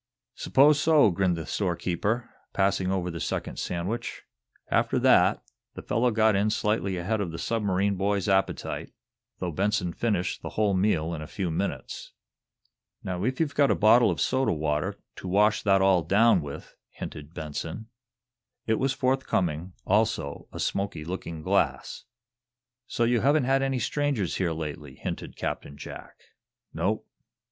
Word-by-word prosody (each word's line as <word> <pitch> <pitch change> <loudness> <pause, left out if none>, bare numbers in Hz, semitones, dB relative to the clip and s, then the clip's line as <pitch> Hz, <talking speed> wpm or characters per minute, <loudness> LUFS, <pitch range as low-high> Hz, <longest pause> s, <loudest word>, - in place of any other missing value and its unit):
"'Spose 145 +2 +4
so," 155 -9 +5
grinned 90 -1 +1
the 80 - -5
storekeeper, 100 +5 -1 0.3
passing 95 -1 +1
over 90 -2 -1
the 85 - -6
second - - -3
sandwich. 95 +8 -3 0.5
After - - +2
that, - - +4 0.3
the - - -8
fellow 120 +3 +1
got 110 -2 +3
in 100 +2 +2
slightly 105 -3 0
ahead 105 +5 -1
of 95 - -2
the 80 - -6
submarine 100 0 0
boy's 100 0 0
appetite, 95 -1 0 0.5
though 90 -2 -3
Benson 95 0 0
finished 100 -2 -1
the - - -5
whole 105 -2 +3
meal 90 -4 +1
in 80 - -5
a 75 - -7
few 90 -1 -3
minutes. 95 +5 -4 0.9
"Now, 90 0 -3
if 130 +3 -1
you've 155 -4 0
got 140 -1 +3
a - - +3
bottle 115 +3 +5
of - - -2
soda 130 0 +1
water, 75 -2 -1 0.2
to - - -7
wash 105 +3 +3
that 95 -2 +3
all 95 -2 +4
down 100 +4 +4
with," 70 -1 -8 0.2
hinted 75 +2 -9
Benson. 80 +7 -5 0.8
It 110 -1 +1
was 135 0 +1
forthcoming, 95 - 0
also 105 +3 0
a - - -8
smoky 95 -6 -2
looking 85 -2 -6
glass. - - 0 0.8
"So 120 - -1
you 120 0 +3
haven't 145 +2 +3
had 135 +2 +2
any 135 -1 0
strangers 140 - -1
here 90 -3 0
lately," 80 -2 -6
hinted - - -6
Captain 70 - -4
Jack. - - -9 0.6
"Nope." - - -1
100 Hz, 155 wpm, -27 LUFS, 85-115 Hz, 0.9 s, so